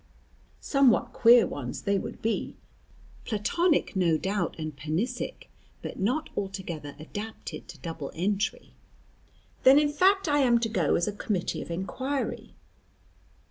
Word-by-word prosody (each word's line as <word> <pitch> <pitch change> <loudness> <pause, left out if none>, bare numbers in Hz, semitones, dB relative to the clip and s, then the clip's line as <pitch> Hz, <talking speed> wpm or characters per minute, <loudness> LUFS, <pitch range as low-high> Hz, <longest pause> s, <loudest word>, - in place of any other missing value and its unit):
Somewhat 275 -4 +3
queer 235 0 +7
ones 125 -4 -5
they 200 -1 +1
would - - -8
be. 225 0 -1 0.7
Platonic 300 - +1
no 170 -4 +3
doubt, 190 0 -1
and 155 -2 -5
panisic, 160 - -3 0.4
but - - -6
not 255 +11 0
altogether 180 -7 -5
adapted 205 +8 -7
to 180 -3 -10
double 165 -4 -6
entry." 200 +4 -1 0.9
"Then 265 +2 +7
in 295 0 +4
fact 385 +4 +3
I 290 -1 +3
am 245 -4 +5
to 225 - 0
go 180 -8 +1
as 175 - +1
a - - 0
committee 200 -3 -2
of - - -8
inquiry." 260 +11 -3
205 Hz, 135 wpm, -28 LUFS, 170-260 Hz, 0.9 s, queer